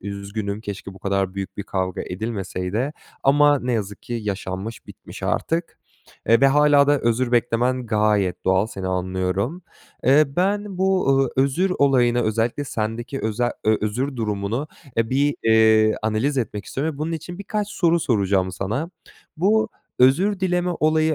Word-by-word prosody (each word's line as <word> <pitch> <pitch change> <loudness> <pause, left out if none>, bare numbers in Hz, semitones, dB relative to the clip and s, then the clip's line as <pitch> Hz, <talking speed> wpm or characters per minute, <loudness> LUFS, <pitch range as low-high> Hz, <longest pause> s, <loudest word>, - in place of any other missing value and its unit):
üzgünüm, 100 +1 -5
keşke 100 -2 -7
bu - - -13
kadar 95 -1 -1
büyük 100 -1 -5
bir 100 - -3
kavga 95 -2 -3
edilmeseydi 100 +4 -3 0.3
ama 145 +1 +5
ne 125 0 -2
yazık 105 -3 -3
ki 120 - -5
yaşanmış, 100 +1 -5
bitmiş - - -12
artık. 165 +1 -2 0.5
Eee, 115 0 +5
ve 140 - +6
hâlâ 145 0 +5
da 145 -1 +3
özür 120 +1 0
beklemen 125 +1 +1
gayet 105 -4 +1
doğal 95 +2 +3
seni 95 -4 -6
anlıyorum. 95 - -2 0.4
Eee, 140 +4 +6
ben 195 +5 -1
bu, 190 -4 +2
ııı, 135 -2 +2
özür 140 +8 +2
olayına 125 -4 +3
özellikle 115 +5 0
sendeki 115 +2 -4
öze 115 +3 -1
ö 110 0 +4
özür 125 +6 -2
durumunu, 110 +5 -2 0.3
eee, 115 -1 +1
bir, 140 +2 +1
eee, 110 -1 +5
analiz 110 +6 0
etmek 105 -4 -3
istiyorum 150 +3 -3
ve - - -13
bunun 160 +2 -2
için 170 +3 -6
birkaç 205 +1 -3
soru 170 -4 +2
soracağım 100 -7 +1
sana. 110 - -3 0.5
Bu 220 +6 +2 0.3
özür 180 +11 +4
dileme 180 -1 0
olayı 155 0 +3
120 Hz, 155 wpm, -22 LUFS, 105-145 Hz, 0.5 s, ve